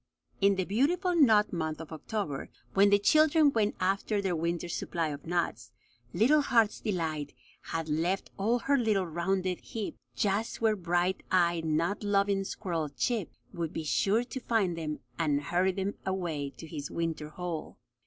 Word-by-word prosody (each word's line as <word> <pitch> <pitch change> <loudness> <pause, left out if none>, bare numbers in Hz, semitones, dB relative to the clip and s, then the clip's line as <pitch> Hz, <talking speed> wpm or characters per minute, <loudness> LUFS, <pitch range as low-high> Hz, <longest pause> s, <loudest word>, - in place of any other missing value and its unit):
In 200 0 +4
the 190 -1 -1
beautiful 345 - +1
nut 220 - +5
month 160 -2 -2
of 165 -1 -9
October, 160 -3 -4 0.2
when 200 +1 +5
the 200 - +6
children 310 +7 +5
went 215 -2 +1
after 195 +3 0
their 190 -3 0
winter's 170 +1 -2
supply 165 -3 -2
of 145 +1 -7
nuts, 175 0 -1 0.4
little 290 +7 +4
Heart's 230 -6 +2
Delight 160 -7 -2 0.3
had 165 -1 -3
left 165 +5 -1
all 220 +5 +1
her 275 +3 +2
little 215 -5 +2
rounded 180 +2 -1
heap 220 -3 -6 0.2
just 210 +3 0
where 220 -1 +3
bright 175 0 0
eyed, 170 -2 +2
nut 165 +7 0
loving 200 -1 +2
squirrel 165 -7 -3
Chip 195 - -1 0.2
would 170 -3 -3
be 160 - -3
sure 200 +9 +2
to 245 +2 -6
find 215 -8 +1
them 155 -2 -4 0.2
and 150 -3 +2
hurry 175 +5 +1
them 195 +2 -2
away 170 -7 -2
to - - -8
his 150 -3 -6
winter 165 -2 -3
hole. 170 0 -5
185 Hz, 165 wpm, -30 LUFS, 165-210 Hz, 0.4 s, the